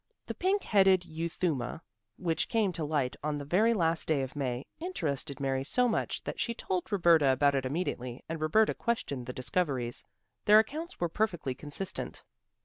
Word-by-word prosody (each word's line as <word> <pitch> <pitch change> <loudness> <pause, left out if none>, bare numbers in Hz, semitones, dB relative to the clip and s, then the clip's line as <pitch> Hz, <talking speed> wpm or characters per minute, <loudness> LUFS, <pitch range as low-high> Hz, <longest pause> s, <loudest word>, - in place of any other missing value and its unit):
The - - -4
pink 390 +3 +1
headed 190 -3 +4
euthuma, 160 -5 -2 0.4
which 165 -3 -1
came 215 -6 +2
to 160 - -3
light 145 -4 0
on 150 -1 -1
the 145 - -6
very 205 +10 +3
last 165 -4 +1
day 145 -4 +2
of 130 - -6
May, 130 -2 -2
interested 155 - -3
Mary 135 -1 0
so 250 - +2
much 225 - -1
that - - -5
she 235 - -1
told 185 0 -3
Roberta 170 -7 +5
about 140 +2 +4
it 135 -1 0
immediately 130 -5 -3
and 160 -1 -4
Roberta 215 +8 +3
questioned 140 - -2
the - - -2
discoverers. 125 -2 -1 0.4
Their 210 +1 +8
accounts 310 +10 0
were 175 - +1
perfectly 175 -7 -1
consistent. 150 +8 -5
160 Hz, 170 wpm, -30 LUFS, 140-195 Hz, 0.4 s, Their